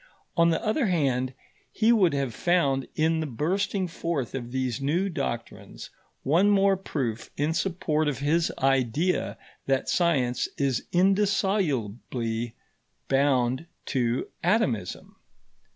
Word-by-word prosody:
On 170 0 +4
the 165 - 0
other 220 +3 +1
hand, 130 -7 0 0.4
he 220 +1 +3
would 190 -9 +4
have 135 -4 -1
found 140 -6 +1
in 160 +1 +2
the 160 - -2
bursting 185 - -1
forth 165 -6 -3
of 120 -2 -5
these 130 0 -2
new 170 +8 +1
doctrines 135 -8 -5 0.3
one 170 +9 +4
more 200 -1 +4
proof 130 - -4
in 150 +3 +1
support 160 -4 0
of 145 -4 -1
his 160 +5 +1
idea 135 +6 +1 0.3
that 135 -1 +1
science 135 -9 +1
is 135 -3 0
indissolubly 155 - 0 0.5
bound 135 +1 +2 0.2
to 125 -2 0 0.2
atomism. 135 - 0
145 Hz, 120 wpm, -26 LUFS, 130-180 Hz, 0.5 s, On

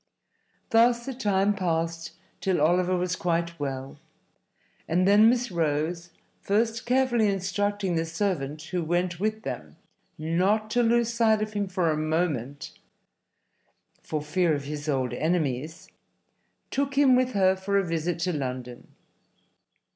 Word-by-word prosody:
Thus 235 +1 +4
the 270 - -4
time 205 -4 +1
passed 165 -3 -2 0.3
till 190 -2 0
Oliver 180 +4 +2
was 180 0 -1
quite 170 -1 -1
well, 135 -1 -5 0.9
and 180 +3 +2
then 210 +3 +7
Miss 245 -2 0
Rose 165 +1 -1 0.3
(first 225 +3 0
carefully 250 -3 +2
instructing 200 0 -1
the 165 0 0
servant 160 -5 -2
who 175 +1 -3
went 175 +1 -1
with 215 +2 -2
them - - -6 0.4
not 185 +7 0
to 245 - +2
lose 235 0 +2
sight 220 -2 +3
of 215 0 -6
him 205 -1 -1
for 180 -3 0
a 155 - -1
moment 155 -4 -2 1.3
for 155 -2 -4
fear 165 +1 +1
of 140 - -4
his 145 +1 -5
old 130 -3 0
enemies) 155 -2 -2 0.8
took 275 0 -1
him 275 -3 +6
with 255 0 +1
her 190 -2 +3
for 195 +1 -1
a 200 - +2
visit 165 0 -2
to 180 +1 0
London. 125 -4 -5
180 Hz, 140 wpm, -26 LUFS, 160-215 Hz, 1.3 s, then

